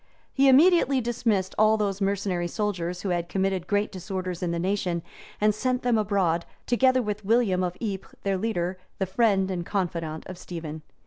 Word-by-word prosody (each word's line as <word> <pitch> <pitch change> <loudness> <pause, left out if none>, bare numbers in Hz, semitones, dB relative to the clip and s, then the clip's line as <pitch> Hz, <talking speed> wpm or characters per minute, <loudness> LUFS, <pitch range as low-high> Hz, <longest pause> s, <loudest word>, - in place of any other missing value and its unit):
He 275 0 +5
immediately 285 -1 +5
dismissed 225 -5 0
all 215 0 +5
those 200 -2 -1
mercenary 195 -3 0
soldiers 180 -3 -3
who 200 - -1
had 175 -1 -1
committed 190 -2 -1
great 205 0 +1
disorders 185 -1 -4
in 180 - -1
the 170 - -1
nation; 180 -2 -1 0.4
and 210 0 +3
he 210 - -12
sent 255 0 0
them 245 -2 +2
abroad, 190 -5 +1 0.2
together 255 +1 +3
with 210 -1 -3
William 200 -4 +2
of 180 0 -3
Ypres, 200 -4 -5
their 195 -1 0
leader, 185 -4 -2 0.2
the 190 - 0
friend 195 -1 +2
and 175 -2 -2
confidant 170 -5 -3
of 185 -1 -8
Stephen. 160 -3 -7
195 Hz, 180 wpm, -26 LUFS, 180-215 Hz, 0.4 s, He